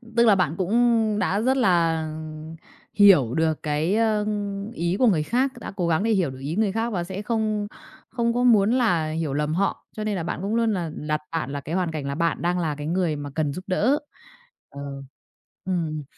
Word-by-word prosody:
Tức 235 0 +5
là 210 - +6
bạn 170 -4 0
cũng 220 +2 +2
đã 200 +2 +1
rất 260 +3 +2
là, 170 -8 +2
ừm, 155 0 -7 0.4
hiểu 180 - +6
được 160 -1 0
cái, 155 +6 0
a, 220 -2 +2 0.5
ý 170 +2 -1
của 250 - +5
người 160 -7 +3
khác, 255 - +1
đã - - -7
cố 175 -3 -1
gắng 165 +3 +1
để 225 - +1
hiểu 185 -8 +2
được 130 - -9
ý 145 +5 -4
người 210 -2 +1
khác 225 +3 -1
và 175 -4 -1
sẽ 190 +3 -6
không 215 -2 -1 0.4
không 235 -1 0
có 245 +1 0
muốn 220 -3 +5
là 180 -11 +2
hiểu 155 -3 -2
lầm 150 +1 -1
họ. 195 +4 -1
Cho 215 - -3
nên 210 -1 -1
là 170 - -3
bạn - - -3
cũng 205 +3 -1
luôn 230 -2 +2
là 170 -4 -3
đặt 150 0 -2
bạn 160 -5 -2
là 140 0 -4
cái 155 +6 -4
hoàn 180 -3 0
cảnh 150 -3 -4
là 140 - -3
bạn 170 +1 0
đang 175 +1 0
là 155 -3 -1
cái 145 +1 -6
người 175 -2 0
mà 145 -1 -6
cần 150 -3 0
giúp 185 - -7
đỡ. 235 +10 +2 0.7
Ờ, 140 - -9 0.8
ừm. 165 -5 -2
180 Hz, 225 wpm, -24 LUFS, 155-215 Hz, 0.8 s, là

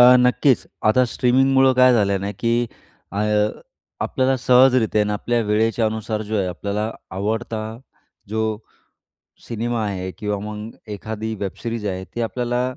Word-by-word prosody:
अ, 125 +1 +9
नक्कीच. 125 +1 +3 0.2
आता 125 +3 +4
स्ट्रीमिंगमुळं 130 +1 +4
काय 125 0 +6
झालंय 100 -4 +2
ना? 100 +1 -3
की 115 0 +2 0.6
अ, 100 - -3 0.8
आपल्याला 130 0 +1
सहजरित्या 125 -3 +4
आहे - - +3
ना, 105 - -1
आपल्या 120 +3 0
वेळेच्यानुसार 110 0 0
जो 110 - +1
आहे, 95 -3 +1
आपल्याला 100 +4 -3 0.3
आवडता 110 +3 -2 0.7
जो 110 +2 -2 1.1
सिनेमा 115 0 -2
आहे 95 -2 -3
किंवा 105 -2 -2
मग 105 +1 -6 0.2
एखादी 110 +2 -4
वेब 100 -2 -2
सिरीज 115 -3 -3
आहे. 95 -1 -3
ती 120 - -7
आपल्याला 120 +1 -1
110 Hz, 140 wpm, -21 LUFS, 105-125 Hz, 1.1 s, अ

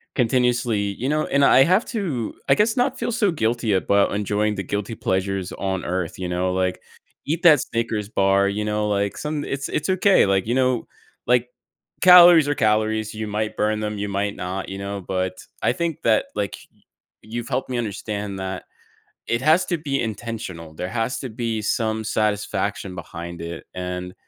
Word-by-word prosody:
continuously, 120 -2 +1
you 100 +6 -2
know 155 +1 +1
and 140 0 +2
I 135 - +7
have 185 - +3
to, 160 - -3
I - - +5
guess, 215 +3 +2
not 255 +2 +1
feel - - -1
so 220 -5 +2
guilty 115 -6 0
about 100 +1 +2
enjoying 105 +1 0
the 95 - -3
guilty 105 +4 -3
pleasures 95 -1 -2
on 95 -2 -3
Earth, 90 0 -3
you 90 - -3
know, 90 +1 0
like, 95 0 -1 0.4
eat 160 +3 -1
that 155 -6 +7
Snickers 115 -3 -2
bar, 100 -1 +3
you 105 +1 -2
know, 105 0 0
like, 100 -1 -1
some 150 -1 -3
it's 135 0 -3
it's 150 - -2
okay, 190 +1 +4
like, 95 -1 +1
you 120 - +1
know, 130 -2 +1 0.4
like 125 0 +3 0.5
calories 175 -4 +9
are 145 - +1
calories, 110 -1 +1
you 110 0 -4
might 105 +1 -3
burn 105 0 +1
them, 105 0 -3
you 100 0 -3
might 100 +1 -1
not, 95 +1 -4
you 95 - -5
know, 100 0 -5
but, 95 0 -1 0.3
I 115 - +2
think 170 +1 -3
that, 110 -2 +3
like, 100 -3 -2
y - - -32 0.4
you've 120 +3 -6
helped 130 0 -2
me 125 - -2
understand 105 -2 -4
that 95 -1 -4 0.6
it 115 - 0
has 160 +6 +4
to 175 - -1
be 140 -3 -2
intentional, 105 -8 -6
there 90 +3 -4
has 115 +3 -1
to 130 - -5
be 115 -1 -3
some 110 +1 -1
satisfaction 105 -3 -1
behind 85 -1 -8
it, 85 0 -6
and 90 0 -5
110 Hz, 185 wpm, -22 LUFS, 100-130 Hz, 0.6 s, calories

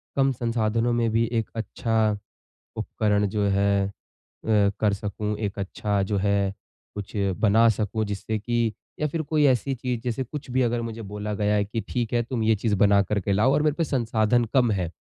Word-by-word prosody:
कम 135 0 +3
संसाधनों 115 -1 0
में 120 -1 +1
भी 115 +1 +2
एक 115 -2 -1
अच्छा 110 -1 0 0.6
उपकरण 105 -1 0
जो 105 +1 -1
है 100 0 +2 0.5
अ, 105 -2 +4
कर 105 -2 +2
सकूँ, 105 +1 -3
एक 105 -2 -3
अच्छा 100 +1 -1
जो 100 +1 -1
है 100 0 +1 0.4
कुछ 100 -1 -6 0.3
बना 110 +2 +5
सकूँ 110 0 -1
जिससे 105 +2 -3
कि 115 +1 0 0.3
या 150 - +1
फिर 160 +2 -2
कोई 155 0 +1
ऐसी 130 +1 +2
चीज़ 125 -1 -3
जैसे 125 +2 -1
कुछ 140 +2 -8
भी 130 +1 +2
अगर 120 -1 +1
मुझे 115 0 -5
बोला 105 0 -5
गया 105 0 +1
है 100 -1 +2
कि 110 +2 -3
ठीक 120 -1 -2
है 120 - +3
तुम 115 -1 -3
ये 110 0 +4
चीज़ 105 0 0
बना 100 0 +5
करके 100 0 -1
लाओ 110 +7 +3
और 145 - +3
मेरे 150 - +2
पे 170 - +2
संसाधन 120 -4 +1
कम 125 -4 +4
हैं, 90 -5 -1
110 Hz, 195 wpm, -25 LUFS, 105-120 Hz, 0.6 s, बना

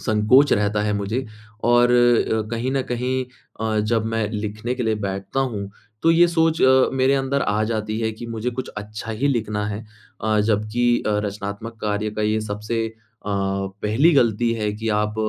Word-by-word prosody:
संकोच 110 +6 +4
रहता 105 0 +1
है 105 0 0
मुझे 105 +6 -2 0.4
और 120 +1 +5
अ, 120 -3 +3
कहीं 120 +2 -2
न 135 -1 +1
कहीं 125 +1 -1 0.4
अ, 110 -1 0
जब 110 +1 0
मैं 110 -2 0
लिखने 110 +3 -3
के 125 - -3
लिए 110 -2 +1
बैठता 100 +7 -3
हूँ। 105 -7 -3 0.3
तो 165 - +5
ये 170 +1 +6
सोच 165 -1 +1
अ, 130 0 +5
मेरे 135 +1 +3
अंदर 135 0 0
आ 105 +1 +1
जाती 110 -1 -2
है 110 -1 0
कि 120 +2 -8
मुझे 115 +1 -3
कुछ 125 +1 -5
अच्छा 105 +2 -6
ही 115 +6 0
लिखना 105 -5 -1
है। 105 +1 -4 0.4
अ, 110 -1 +1
जबकि 110 +3 0 0.2
अ, - - +2
रचनात्मक 100 +3 -5
कार्य 105 0 -1
का 105 0 -3
ये 110 +1 +1
सबसे 110 +2 -3
अ, 110 - -8 0.3
पहली 100 - +1
गलती 115 -3 +3
है 105 -2 -1
कि 110 +2 -4
आप 105 0 -3
110 Hz, 185 wpm, -22 LUFS, 105-120 Hz, 0.4 s, ये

